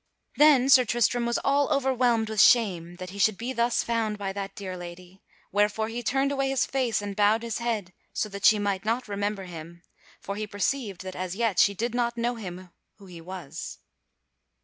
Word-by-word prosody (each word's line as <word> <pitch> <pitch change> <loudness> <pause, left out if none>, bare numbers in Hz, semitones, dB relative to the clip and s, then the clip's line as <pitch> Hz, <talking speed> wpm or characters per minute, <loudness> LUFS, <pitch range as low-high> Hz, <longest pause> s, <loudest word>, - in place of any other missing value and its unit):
Then 290 -4 +6
Sir 265 -2 +7
Tristram 240 +1 +1
was 235 - 0
all 280 0 +2
overwhelmed 250 -5 +1
with 220 -1 +2
shame 180 -8 +3
that 185 0 -8
he 200 - -9
should 200 0 +3
be 245 +3 -4
thus 235 0 +1
found 225 -2 -1
by 195 -1 -4
that 195 0 -6
dear 190 -2 -6
lady; 180 +1 -11 0.3
wherefore 210 +2 +1
he 235 +2 -4
turned 270 +4 0
away 275 -1 0
his 270 -2 +1
face 245 -6 -1
and 200 -1 -5
bowed 210 +3 +3
his 230 0 -3
head 220 -6 -3 0.2
so - - -2
that 200 0 -8
she 215 - +6
might 200 -2 -1
not 230 +3 -1
remember 205 0 -3
him, 170 -1 -10 0.4
for 200 - -6
he 215 0 -4
perceived 205 -1 -2
that 185 0 -7
as 185 0 -4
yet 225 -4 0
she 200 - +4
did 235 +3 -2
not 240 -1 -1
know 240 +1 0
him 185 -5 -8 0.2
who 200 - -16
he 175 -3 -11
was. 180 -4 -8
210 Hz, 200 wpm, -26 LUFS, 190-240 Hz, 0.4 s, Sir